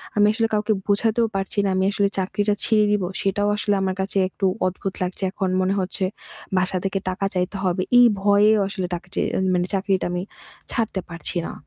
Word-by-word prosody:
আমি 205 0 +5
আসলে 225 0 +1
কাউকে 215 +1 +2
বোঝাতেও 225 +3 +2
পারছি 195 +1 -2
না। - - +1
আমি 190 0 +2
আসলে 200 0 +2
চাকরিটা 205 +2 0
ছেড়ে 215 -2 +4
দিবো 200 -3 +1
সেটাও 205 +1 0
আসলে 205 0 +1
আমার 190 -1 -1
কাছে 195 +1 -3
একটু 195 - -3 0.2
অদ্ভুত 185 +1 -4
লাগছে। 180 +2 -4
এখন 190 -2 -2
মনে 185 +1 +1
হচ্ছে 190 0 -1 0.5
বাসা 185 0 +1
থেকে 195 0 -1
টাকা 185 +1 -2
চাইতে 180 +2 -1
হবে 185 0 +1 0.2
এই 245 - +8 0.2
ভয়ে 205 +1 +5 0.2
আসলে 190 -2 -3
টাকা 170 - -9
চেরি - - 0 0.3
মানে 180 +1 0
চাকরিটা 195 -1 0
আমি 180 +1 -2 0.5
ছাড়তে 220 -5 -1
পারছি 170 +1 -4
না। - - -7
195 Hz, 190 wpm, -23 LUFS, 185-205 Hz, 0.5 s, এই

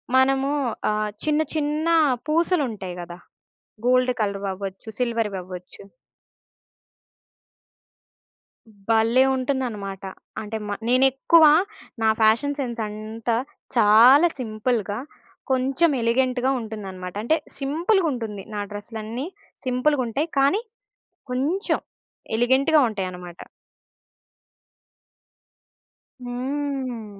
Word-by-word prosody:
మనము 270 +1 +3 0.4
ఆహ్, 210 0 -1
చిన్న, 305 0 +2
చిన్న 305 +1 -1 0.4
పూసలుంటాయి 285 - 0
గదా! 175 0 -8 0.7
గోల్డ్ 255 0 +4
కలర్ 200 -1 -1
అవ్వచ్చు, 195 +2 -7
సిల్వర్ 230 -4 0
అవ్వచ్చు. 180 0 -10 2.9
హ్మ్, 220 - -19 0.2
భలే 225 +3 +4
ఉంటుందన్నమాట. 240 -8 -3 0.4
అంటే 220 +1 -4
మ - - -4 0.2
నేనెక్కువ 270 +6 +5 0.6
నా 220 - +4
ఫ్యాషన్ 235 +7 +3
సెన్స్ 240 -3 -3
అంతా 220 +2 -3 0.4
చాలా 240 +8 +7
సింపుల్‌గా, 215 -2 -1 0.5
కొంచెం 265 +6 +2
ఎలిగెంట్‌గా 255 +2 +1
ఉంటుందన్నమాట. 195 -5 -7
అంటే 315 +7 +2 0.2
సింపు‌లుగుంటుంది. 275 - 0
నా 205 - -2
డ్రెస్‌లన్నీ 220 +5 -6 0.4
సింపులుగుంటాయి. 255 +1 +1
కానీ 280 +11 +3 0.7
కొంచెం, 305 - 0 0.6
ఎలిగెంట్‌గా 270 +6 +4
ఉంటాయన్నమాట. 180 -4 -6 2.8
హ్మ్. 250 -4 -4
245 Hz, 80 wpm, -23 LUFS, 215-275 Hz, 2.9 s, చాలా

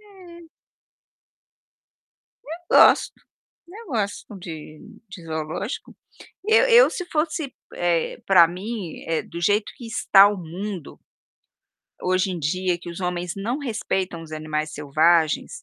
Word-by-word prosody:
É. 355 -5 -15 2.2
Eu - - +5
gosto, - - +6 0.5
eu 425 +6 -12
gosto 210 -4 -3
de 155 -3 -9 0.3
de 195 -4 -10
zoológico. 160 - -5 0.5
Eu 450 +3 +5
eu - - +7
se 360 - -5
fosse, 305 -2 -1 0.2
eh, 170 -2 0
para 180 -4 +7
mim, 185 0 -6
eh, 165 -1 0
do 170 - -8
jeito 205 +4 +1
que 240 - -10
está 200 -3 +6
o 205 -1 -2
mundo 180 +1 -7 1.0
hoje 185 +1 +1
em 180 - -4
dia 180 +3 -1
que 175 0 -9
os 170 - -8
homens 180 -1 -3
não 230 +7 -2
respeitam 190 - -3
os 160 -1 -12
animais 155 0 -3
selvagens, 155 - +1
185 Hz, 125 wpm, -23 LUFS, 165-235 Hz, 2.2 s, eu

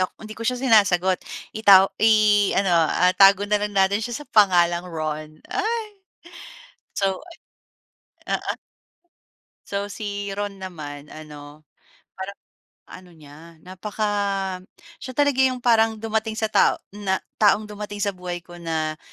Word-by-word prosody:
Yuck, 185 - -1
hindi 215 0 -9
ko 230 - -7
siya 250 +1 +1
sinasagot. 190 -7 +3 0.4
Itaw 195 -3 +6
i-ano, 205 -3 +3
ah, 170 +2 +3
'tago 195 0 +6
nalang 210 -1 0
natin 195 +2 +3
siya 240 +6 -5
sa - - -33
pangalang 175 -4 +3
Ron. 155 -1 -5
Ay. 445 +2 -1 1.1
So, 195 -2 0 1.1
ayon. - - 0
Oo. - - -4 1.1
So, 200 0 -3
si 205 0 -5
Ron 205 -1 -5
naman, 150 -6 -8
ano, 150 -1 -12 0.5
parang 195 +1 -7 0.5
ano 185 -1 -12
niya, 160 +2 -15
napaka 205 +4 -4 0.9
siya 260 - -7
talaga 285 -1 +1
‘yong 255 -2 +1
parang 225 -2 +3
dumating 220 0 -2
sa 220 -1 -1
tao 205 - +3
na 195 -2 -2 0.2
taong 210 0 +4
dumating 210 0 -7
sa 200 - +1
buhay 180 -1 -6
ko 175 0 -13
na 160 -2 -3
195 Hz, 130 wpm, -23 LUFS, 175-215 Hz, 1.1 s, Itaw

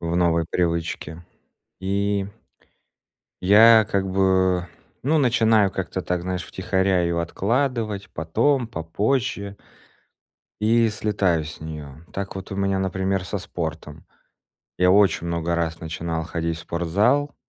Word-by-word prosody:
в 85 0 -2
новой 85 -1 +2
привычке. 85 -1 -2 0.6
И 100 +1 -1 1.1
я 110 +3 +7
как 95 -1 0
бы, 95 -2 +2 0.3
ну, 150 +5 +2
начинаю 115 -6 +3
как-то 95 0 -4
так, 90 -1 -1
знаешь, 90 0 -3
втихаря 95 0 0
ее 85 0 0
откладывать, 110 +2 -1
потом, 120 - +1
попозже. 100 +4 -2 1.1
И 115 +1 +4
слетаю 100 -6 0
с 75 0 -9
нее. 75 -1 -8
Так 100 0 -5
вот 95 +1 -7
у - - -4
меня, 100 0 0
например, 95 0 -1
со 100 - -3
спортом. 80 -4 -6 0.7
Я 90 0 +4
очень 100 -3 +3
много 85 0 -1
раз 85 -1 -2
начинал 80 0 -4
ходить 85 -1 -3
в - - -8
спортзал. 100 - +1
95 Hz, 125 wpm, -23 LUFS, 85-105 Hz, 1.1 s, я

